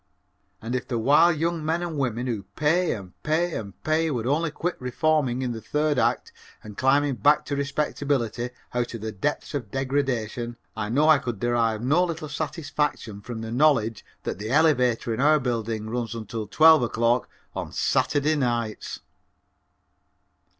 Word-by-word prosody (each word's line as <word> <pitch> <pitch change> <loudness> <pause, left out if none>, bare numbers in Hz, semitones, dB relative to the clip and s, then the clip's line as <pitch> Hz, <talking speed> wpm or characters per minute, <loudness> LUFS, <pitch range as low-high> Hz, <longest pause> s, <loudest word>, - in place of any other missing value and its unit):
And 115 +2 -4
if 125 - -2
the 120 - -2
wild 150 +8 +4
young 165 0 -1
men 165 +3 0
and 175 - -3
the - - -6
women 125 -2 -1
who 115 -5 -2
pay 165 +4 +2
and 95 -4 -10
pay 165 +3 0
and 100 -4 -7
pay 160 +1 +1
would 120 -6 -2
only 155 +5 +1
quit 170 +3 -3
reforming 130 0 0
in 125 - -1
the 115 -1 -6
third 150 0 0
act - - 0 0.3
and 105 -1 -10
climbing 135 +1 +2
back 150 +7 +3
to 140 - -2
respectability 140 -4 -1 0.2
out 120 -1 -1
of 115 - -7
the 110 0 -4
depths 145 +12 -3
of 125 -8 -4
degradation, 125 -3 -2 0.2
I 105 -1 -3
know 145 +6 +3
I 155 -3 +6
could 120 -6 -4
derive 115 -1 +1
no 150 +8 +3
little 160 -3 -4
satisfaction 145 -7 -3
from 115 +1 -6
the 115 0 -6
knowledge 120 -5 +2 0.2
that - - -4
the 105 +1 -5
elevator 125 -6 +3
in 110 - -4
our 150 +2 +5
building 115 -4 -2
runs 115 0 -3
until 110 -1 -5
twelve 160 -2 +6
o'clock 120 +1 +1 0.3
on - - -4
Saturday 150 +1 +1
nights. 120 -5 -2
130 Hz, 170 wpm, -25 LUFS, 115-150 Hz, 0.3 s, I